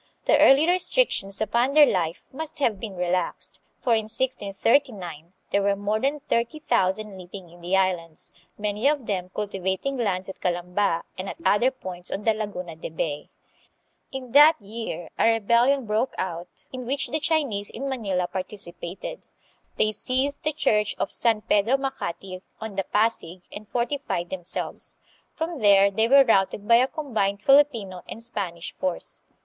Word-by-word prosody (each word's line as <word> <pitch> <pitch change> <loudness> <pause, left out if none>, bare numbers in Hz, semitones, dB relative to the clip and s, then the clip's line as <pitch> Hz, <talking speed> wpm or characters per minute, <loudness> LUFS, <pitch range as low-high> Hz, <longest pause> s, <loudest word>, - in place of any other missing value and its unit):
The - - +4
early 280 +4 +6
restrictions 355 - +1
upon 240 +5 +1
their 300 -1 +9
life 175 - -1
must 315 +3 -6
have 230 -9 +1
been 200 -1 -6
relaxed, 180 0 -2 0.2
for 240 - +3
in 220 -1 +1
1639 210 - 0 0.2
there 200 - +2
were 200 0 +2
more 205 +2 -1
than 280 +4 -1
thirty 235 +5 -1
thousand 210 -7 0
living 180 -1 -10
in 175 0 -16
the 180 +3 +1
Islands, 175 -4 -1 0.3
many 210 +4 0
of 290 -4 +1
them 185 -3 -2
cultivating 195 +6 -2
lands 190 -6 -1
at 190 - -8
Calamba 180 0 0 0.2
and 190 - -4
at - - -6
other 220 +5 +4
points 185 -9 -6
on 205 - -4
the 225 - +3
Laguna 200 -6 -5
de 160 - -7
Bay. 150 -2 -3 0.8
In 260 -2 -7
that 295 +3 +7
year 210 -4 -6
a 230 - +5
rebellion 235 +5 +3
broke 215 +4 0
out, 175 -1 -5
in 255 -2 -6
which 275 0 -1
the 310 +5 -1
Chinese 285 -10 0
in 275 +4 -5
Manila 200 -9 -1
participated. 185 - -6 0.5
They 215 - +2
seized 260 +6 -1
the 310 - +1
church 210 -8 +1
of - - -2
San 225 -3 +3
Pedro 220 +6 +3
Macati, 195 -9 -5 0.2
on 220 -2 -6
the 195 -1 -1
Pasig, 190 -5 0
and 210 +1 -9
fortified 240 -8 -2
themselves. 180 -2 -3 0.4
From 325 -1 -3
there 200 -2 +6
they 220 +3 +2
were 275 +2 +7
routed 205 -3 +1
by 230 0 +7
a 255 +2 +4
combined 220 -10 -2
Filipino 235 -10 +3
and 225 - -6
Spanish 185 -7 -4
force. 185 -2 -3
210 Hz, 160 wpm, -25 LUFS, 185-255 Hz, 0.8 s, their